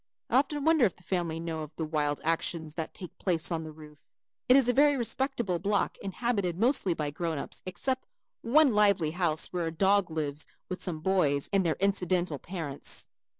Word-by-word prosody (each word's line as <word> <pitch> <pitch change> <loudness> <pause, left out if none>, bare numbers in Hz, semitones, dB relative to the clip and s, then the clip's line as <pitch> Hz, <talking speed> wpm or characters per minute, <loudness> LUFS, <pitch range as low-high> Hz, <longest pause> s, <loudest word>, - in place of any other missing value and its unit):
I 245 - +5
often 290 +1 0
wonder 320 -4 +4
if 190 - 0
the 175 - -22
family 170 -3 -2
know 165 -1 -4
of 155 0 -8
the 160 - -2
wild 150 -2 -1
actions 160 -1 -1
that 160 -1 -5
take 180 - -9
place 175 -2 0
on 165 -1 -1
the 155 - -7
roof. 150 -1 -14 0.5
It 250 - +8
is 270 -3 +5
a 245 - +3
very 285 +2 +5
respectable 235 -5 -1
block 200 +2 0
inhabited 200 -3 -1
mostly 220 -5 +3
by 150 -2 -2
grown 165 +1 -2
ups - - -6
except 260 +7 -2 0.3
one 275 +2 +4
lively 200 -7 +3
house 170 -2 0
where 175 -2 -1
a - - -2
dog 195 +3 +3
lives 150 -2 -3 0.2
with 185 - -4
some 165 -4 -2
boys 155 -6 +1
and 195 -1 +4
their 165 -3 0
incidental 180 -5 0
parents. 160 -6 -3
180 Hz, 195 wpm, -29 LUFS, 160-210 Hz, 0.5 s, It